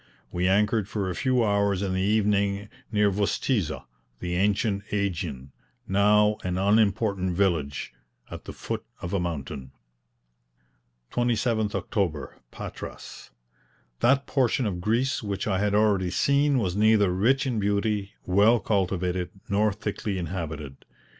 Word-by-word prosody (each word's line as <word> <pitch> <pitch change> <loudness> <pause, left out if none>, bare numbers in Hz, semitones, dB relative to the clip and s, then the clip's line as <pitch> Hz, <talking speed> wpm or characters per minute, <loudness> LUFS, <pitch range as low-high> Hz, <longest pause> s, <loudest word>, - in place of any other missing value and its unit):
We 90 +1 0
anchored 105 +1 +2
for 100 -3 -2
a - - -5
few 130 +1 +2
hours 100 -2 +1
in 95 -2 -1
the 95 - 0
evening 100 0 +1 0.2
near 105 -2 +3
Vostizza, 100 - -1 0.3
the 90 -1 -3
ancient 100 +2 +1
AEgion, 85 -10 -3 0.4
now 105 +2 +4
an 90 0 -2
unimportant 100 -2 +2
village, 80 -10 0 0.4
at - - -8
the - - -6
foot - - -5 0.2
of 85 - -4
a 100 - +1
mountain. 70 -6 -5 1.4
27th 115 -3 0
October, 80 -9 -2
Patras. - - -9 0.7
That 135 +3 +3
portion 130 -2 +1
of 90 -4 -2
Greece 120 +8 +1
which 100 -3 -3
I 95 -3 0
had 105 0 +1
already 105 -4 +3
seen 140 +9 +2
was 95 -7 0
neither 105 -3 +4
rich 125 +10 +2
in 125 -4 -1
beauty, 100 0 -1
well 105 +6 +4
cultivated, 90 -3 -1 0.2
nor 105 +2 +2
thickly 105 -1 -4
inhabited. 80 -5 -5
100 Hz, 130 wpm, -26 LUFS, 90-110 Hz, 1.4 s, now